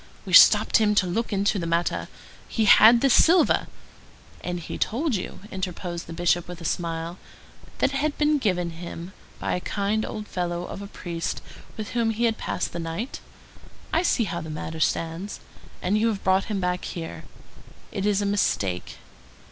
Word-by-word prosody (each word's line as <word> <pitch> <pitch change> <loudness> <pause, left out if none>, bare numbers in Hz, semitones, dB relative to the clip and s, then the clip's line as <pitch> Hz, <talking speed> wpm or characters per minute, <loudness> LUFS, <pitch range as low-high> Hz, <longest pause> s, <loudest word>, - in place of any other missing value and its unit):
We - - -6
stopped - - +8
him 210 -2 +2
to 200 - +4
look 220 +7 -2
into 200 0 +1
the 170 - -3
matter. 170 +1 0 0.4
He 225 - 0
had 225 +3 +8
this 275 -3 +4
silver—" 340 +1 +5 0.8
"And 175 0 -3
he 170 - -7
told 280 +5 0
you," 190 -2 -4
interposed 180 -2 -4
the - - -8
Bishop 175 0 +1
with 175 -1 -8
a 170 - -9
smile, 165 +1 -3 0.6
"that 275 - +1
it - - 0
had 295 +1 -1
been 300 0 +3
given 180 -7 0
to - - -12
him 170 +1 -7 0.2
by - - -2
a - - 0
kind 205 +3 -1
old 215 0 -5
fellow 175 -1 -2
of 195 - -7
a 200 - -7
priest 170 -3 -4 0.4
with 215 -1 -5
whom 235 -2 +1
he 225 +1 -1
had 225 -2 +1
passed - - -3
the 170 - -4
night? 165 - -4 0.7
I 330 - +4
see 310 -9 +2
how 170 -4 -3
the 160 - -7
matter 160 +1 -5
stands. 165 +5 -1 0.4
And 200 +4 +2
you 225 - +2
have 210 -3 -2
brought 190 +1 +3
him 210 -3 -2
back 180 -1 -1
here? 165 -2 -6 0.7
It 200 -1 -2
is 205 0 +2
a - - -1
mistake." 100 - -1
190 Hz, 190 wpm, -25 LUFS, 170-220 Hz, 0.8 s, stopped